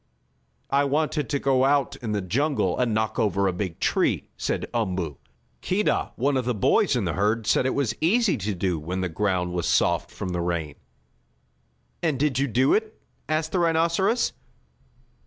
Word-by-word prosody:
"I 140 Hz, +1 st, +3 dB
wanted 150 Hz, -1 st, 0 dB
to 140 Hz, -, +1 dB
go 135 Hz, -2 st, +2 dB
out 140 Hz, 0 st, +2 dB
in 115 Hz, -5 st, -5 dB
the 105 Hz, -2 st, -1 dB
jungle 135 Hz, -, 0 dB
and 125 Hz, -2 st, +1 dB
knock 110 Hz, 0 st, -1 dB
over 100 Hz, -2 st, +1 dB
a 95 Hz, -, 0 dB
big 90 Hz, -2 st, -4 dB
tree," -, -, 0 dB
said -, -, -2 dB
Umboo. 90 Hz, -, -2 dB, 0.4 s
"Keedah, 200 Hz, +3 st, 0 dB
one 135 Hz, +2 st, +1 dB
of 130 Hz, -, -1 dB
the 125 Hz, -1 st, 0 dB
boys 100 Hz, -, +3 dB
in -, -, 0 dB
the -, -, -1 dB
herd, 105 Hz, +3 st, 0 dB
said 130 Hz, -, +2 dB
it -, -, -1 dB
was 135 Hz, -6 st, 0 dB
easy 210 Hz, +6 st, +3 dB
to 105 Hz, 0 st, -3 dB
do 90 Hz, -2 st, -1 dB
when 90 Hz, +5 st, -4 dB
the 90 Hz, -, -1 dB
ground 90 Hz, 0 st, -1 dB
was 90 Hz, -2 st, -1 dB
soft -, -, +2 dB
from 95 Hz, -, -6 dB
the 90 Hz, -1 st, -2 dB
rain." 85 Hz, -4 st, -2 dB, 1.3 s
"And 155 Hz, -5 st, 0 dB
did 140 Hz, -3 st, +1 dB
you 140 Hz, -, +1 dB
do 130 Hz, +3 st, +3 dB
it?" 220 Hz, 0 st, -1 dB, 0.3 s
asked 155 Hz, 0 st, 0 dB
the 185 Hz, -, +1 dB
rhinoceros. 170 Hz, +6 st, +2 dB
120 Hz, 180 wpm, -25 LUFS, 95-145 Hz, 1.3 s, I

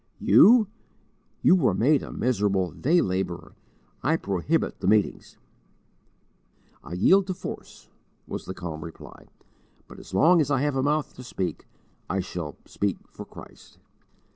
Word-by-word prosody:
"You? 235 Hz, 0 st, +6 dB, 0.8 s
you -, -, +6 dB
were 130 Hz, -, +2 dB
made 140 Hz, +6 st, +3 dB
a -, -, -8 dB
miserable 100 Hz, -7 st, 0 dB
day 170 Hz, +6 st, +2 dB
labourer; 90 Hz, -2 st, -3 dB, 0.5 s
I 155 Hz, +6 st, +1 dB
prohibit 95 Hz, -, -1 dB
the -, -, -3 dB
meetings." 105 Hz, -1 st, +1 dB, 1.5 s
"I 80 Hz, -, -9 dB
yield 190 Hz, -, +4 dB
to 185 Hz, -, -3 dB
force," 185 Hz, -, -9 dB, 0.4 s
was -, -, -6 dB
the 95 Hz, -, -6 dB
calm 80 Hz, -3 st, -6 dB
reply, 80 Hz, -, -12 dB, 0.6 s
"but -, -, -13 dB
as -, -, -13 dB
long 165 Hz, -, +5 dB
as 145 Hz, -, -1 dB
I 135 Hz, -2 st, +1 dB
have 145 Hz, -1 st, 0 dB
a 135 Hz, -, +1 dB
mouth 150 Hz, +2 st, 0 dB
to 125 Hz, -, -9 dB
speak 95 Hz, -7 st, -5 dB, 0.4 s
I 95 Hz, -, -1 dB
shall 85 Hz, -5 st, -5 dB
speak 100 Hz, -3 st, -2 dB
for -, -, -9 dB
Christ." -, -, -15 dB
110 Hz, 145 wpm, -25 LUFS, 90-150 Hz, 1.5 s, You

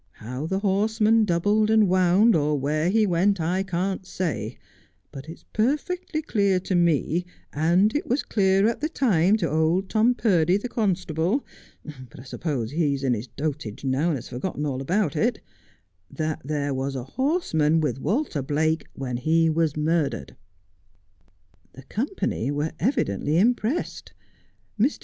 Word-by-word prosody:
How 125 Hz, +7 st, -6 dB
the 190 Hz, -, -1 dB
horseman 215 Hz, +2 st, +2 dB
doubled 205 Hz, +4 st, +2 dB
and 220 Hz, -2 st, +4 dB
wound, 185 Hz, +5 st, +4 dB
or 150 Hz, -1 st, +1 dB
where 155 Hz, +5 st, 0 dB
he 215 Hz, +2 st, +3 dB
went, 190 Hz, +2 st, +2 dB
I 175 Hz, +4 st, 0 dB
can't 190 Hz, +1 st, -2 dB
say; 160 Hz, -, -4 dB, 0.5 s
but 140 Hz, +3 st, -9 dB
it's 165 Hz, -, -11 dB
perfectly 310 Hz, -, -1 dB
clear 200 Hz, -8 st, +1 dB
to 190 Hz, -, -3 dB
me, 170 Hz, 0 st, +2 dB, 0.3 s
and 175 Hz, -, +2 dB
it 295 Hz, -, -1 dB
was 255 Hz, +5 st, 0 dB
clear 195 Hz, 0 st, +2 dB
at 230 Hz, -, -1 dB
the 310 Hz, -, -1 dB
time 210 Hz, -, +2 dB
to 175 Hz, -6 st, -1 dB
old 160 Hz, +5 st, +1 dB
Tom 230 Hz, +3 st, +3 dB
Purdy, 180 Hz, -6 st, +2 dB
the 205 Hz, -, -4 dB
constable 190 Hz, -, -1 dB, 0.3 s
— 130 Hz, -5 st, -12 dB
but -, -, -14 dB
I -, -, -10 dB
suppose 130 Hz, -3 st, -3 dB
he's 145 Hz, -3 st, 0 dB
in 130 Hz, -2 st, +2 dB
his 115 Hz, +2 st, -4 dB
dotage 140 Hz, -6 st, -5 dB
now 135 Hz, +5 st, +1 dB
and 160 Hz, -5 st, +1 dB
has 120 Hz, -, -9 dB
forgotten 145 Hz, +4 st, -4 dB
all 135 Hz, -2 st, -2 dB
about 175 Hz, +2 st, 0 dB
it -, -, +1 dB, 0.4 s
— 90 Hz, -1 st, -45 dB
that 155 Hz, 0 st, -2 dB
there 145 Hz, -1 st, -2 dB
was 135 Hz, +1 st, -3 dB
a 130 Hz, -, -4 dB
horseman 165 Hz, -, +1 dB
with 145 Hz, -5 st, -1 dB
Walter 215 Hz, -, -1 dB
Biake 155 Hz, +3 st, 0 dB
when 125 Hz, -3 st, -4 dB
he 160 Hz, +5 st, +2 dB
was 155 Hz, -2 st, 0 dB
murdered.' 150 Hz, -, -1 dB, 1.4 s
The 135 Hz, -, -12 dB
company 220 Hz, -, -2 dB
were 145 Hz, +2 st, -1 dB
evidently 155 Hz, -, 0 dB
impressed. 240 Hz, -, 0 dB, 0.7 s
Mr. 255 Hz, +8 st, +2 dB
170 Hz, 160 wpm, -24 LUFS, 145-205 Hz, 1.4 s, and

